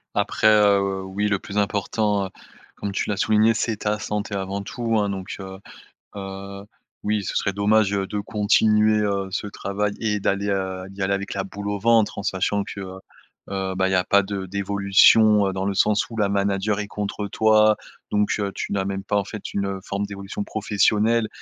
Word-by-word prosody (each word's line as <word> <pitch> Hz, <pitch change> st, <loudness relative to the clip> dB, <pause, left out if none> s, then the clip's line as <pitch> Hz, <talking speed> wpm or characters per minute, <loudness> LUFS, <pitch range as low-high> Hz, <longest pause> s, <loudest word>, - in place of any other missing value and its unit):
Après -, -, +1 dB
heu, 100 Hz, -2 st, +4 dB
oui, 95 Hz, +2 st, -2 dB
le 100 Hz, -1 st, +1 dB
plus 100 Hz, +2 st, -7 dB
important, 105 Hz, 0 st, 0 dB
heu, -, -, -6 dB, 0.5 s
comme 100 Hz, -, -4 dB
tu 100 Hz, -, -2 dB
l'as 105 Hz, -, -1 dB
souligné 110 Hz, +2 st, +3 dB
c'est 115 Hz, -1 st, -1 dB
ta 105 Hz, +1 st, -1 dB
santé 105 Hz, 0 st, -3 dB
avant 95 Hz, +1 st, -3 dB
tout, 115 Hz, +1 st, -2 dB
hein, 105 Hz, -1 st, +1 dB
donc, 95 Hz, -1 st, -5 dB
heu 95 Hz, 0 st, -8 dB, 0.6 s
heu, 100 Hz, 0 st, -7 dB, 0.4 s
oui, 105 Hz, -1 st, 0 dB
ce -, -, -4 dB
serait 100 Hz, -, +1 dB
dommage, 100 Hz, +1 st, +2 dB
heu, 100 Hz, -1 st, -1 dB
de 105 Hz, -, -3 dB
continuer, 105 Hz, +1 st, +3 dB
heu, 100 Hz, -2 st, -1 dB
ce 105 Hz, +2 st, -3 dB
travail 100 Hz, +1 st, -2 dB
et 105 Hz, -2 st, -1 dB
d'aller, 100 Hz, +1 st, 0 dB
heu, 95 Hz, -1 st, -2 dB
d'y 100 Hz, +1 st, -9 dB
aller 95 Hz, +1 st, +1 dB
avec 100 Hz, 0 st, -3 dB
«la 100 Hz, -, -2 dB
boule 100 Hz, +1 st, -7 dB
au 105 Hz, 0 st, -1 dB
ventre» 115 Hz, 0 st, +3 dB
en 100 Hz, -, -5 dB
sachant 100 Hz, +2 st, 0 dB
que, 100 Hz, -, -8 dB
heu 95 Hz, -1 st, -7 dB, 0.5 s
heu, 95 Hz, -1 st, -3 dB
bah 95 Hz, 0 st, +1 dB
il -, -, -2 dB
y -, -, +2 dB
a 90 Hz, 0 st, +2 dB
pas 100 Hz, -2 st, +4 dB
de 95 Hz, -1 st, -4 dB
d'évolution, 100 Hz, +2 st, +4 dB
heu, -, -, -2 dB
dans 95 Hz, 0 st, -3 dB
le 100 Hz, -, 0 dB
sens 105 Hz, +1 st, +2 dB
où 115 Hz, -, -8 dB
la 105 Hz, -3 st, +1 dB
manager 100 Hz, +1 st, 0 dB
est 105 Hz, -, -3 dB
contre 105 Hz, 0 st, -4 dB
toi. 110 Hz, +1 st, +4 dB, 0.3 s
Donc, 105 Hz, 0 st, +1 dB
heu, 100 Hz, -1 st, -2 dB
tu -, -, -4 dB
n'as 95 Hz, -1 st, 0 dB
même 95 Hz, 0 st, -3 dB
pas 105 Hz, +1 st, 0 dB
en 100 Hz, -, 0 dB
fait, 105 Hz, 0 st, -7 dB
une, 100 Hz, -, -1 dB
heu, 100 Hz, -1 st, -3 dB
forme 100 Hz, +1 st, -3 dB
d'évolution 100 Hz, 0 st, -6 dB
professionnelle 110 Hz, +2 st, +1 dB
100 Hz, 210 wpm, -23 LUFS, 95-105 Hz, 0.6 s, heu